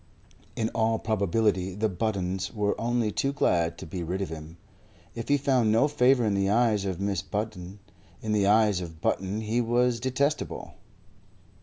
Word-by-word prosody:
In 110 Hz, -1 st, -1 dB
all 115 Hz, 0 st, +1 dB
probability 100 Hz, -3 st, 0 dB
the 110 Hz, +2 st, +1 dB
Buttons 95 Hz, -2 st, -2 dB
were 105 Hz, -3 st, 0 dB
only 120 Hz, -2 st, 0 dB
too 135 Hz, -, 0 dB
glad 85 Hz, -11 st, +1 dB
to -, -, -8 dB
be 90 Hz, +3 st, -5 dB
rid 90 Hz, +3 st, -3 dB
of -, -, -5 dB
him. 80 Hz, +1 st, -9 dB, 0.6 s
If 115 Hz, -1 st, -6 dB
he 145 Hz, -, +4 dB
found 130 Hz, -5 st, +2 dB
no 115 Hz, +6 st, +4 dB
favour 130 Hz, -4 st, +3 dB
in 105 Hz, -, +1 dB
the 100 Hz, 0 st, +1 dB
eyes 110 Hz, -2 st, +2 dB
of 95 Hz, -3 st, -2 dB
Mrs. 100 Hz, -2 st, -2 dB
Button, 100 Hz, -3 st, -4 dB, 0.4 s
in 110 Hz, -, -4 dB
the 105 Hz, -2 st, +2 dB
eyes 105 Hz, -3 st, +4 dB
of 80 Hz, -2 st, -8 dB
Button 95 Hz, +6 st, -1 dB
he 110 Hz, +3 st, 0 dB
was 120 Hz, 0 st, +1 dB
detestable. 135 Hz, +4 st, -2 dB
105 Hz, 170 wpm, -27 LUFS, 95-115 Hz, 0.6 s, he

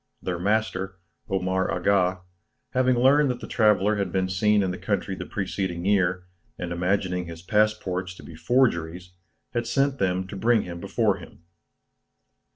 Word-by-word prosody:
Their 90 Hz, -2 st, -3 dB
master, 95 Hz, -1 st, -1 dB, 0.3 s
Omar 95 Hz, 0 st, 0 dB
Aga, 95 Hz, -2 st, +1 dB, 0.5 s
having 130 Hz, -1 st, +3 dB
learned 135 Hz, +4 st, +4 dB
that 125 Hz, -1 st, -2 dB
the -, -, -7 dB
traveller 105 Hz, -2 st, +3 dB
had 100 Hz, -, -1 dB
been 95 Hz, -1 st, 0 dB
seen 105 Hz, +2 st, +3 dB
in 95 Hz, -, -1 dB
the 90 Hz, -, -6 dB
country 95 Hz, +1 st, -1 dB
the -, -, -6 dB
preceding 95 Hz, -3 st, -3 dB
year, 95 Hz, -2 st, +2 dB, 0.3 s
and 90 Hz, -1 st, -5 dB
imagining 90 Hz, 0 st, -1 dB
his 85 Hz, 0 st, -9 dB
passports 100 Hz, -4 st, 0 dB
to -, -, -13 dB
be -, -, -11 dB
forgeries, 90 Hz, -3 st, 0 dB, 0.4 s
had 120 Hz, -1 st, -1 dB
sent 135 Hz, +2 st, +1 dB
them 95 Hz, -1 st, 0 dB
to -, -, -7 dB
bring 115 Hz, +3 st, +2 dB
him 85 Hz, -1 st, -7 dB
before 100 Hz, +1 st, +1 dB
him. 85 Hz, -1 st, -14 dB
95 Hz, 160 wpm, -25 LUFS, 90-110 Hz, 0.5 s, learned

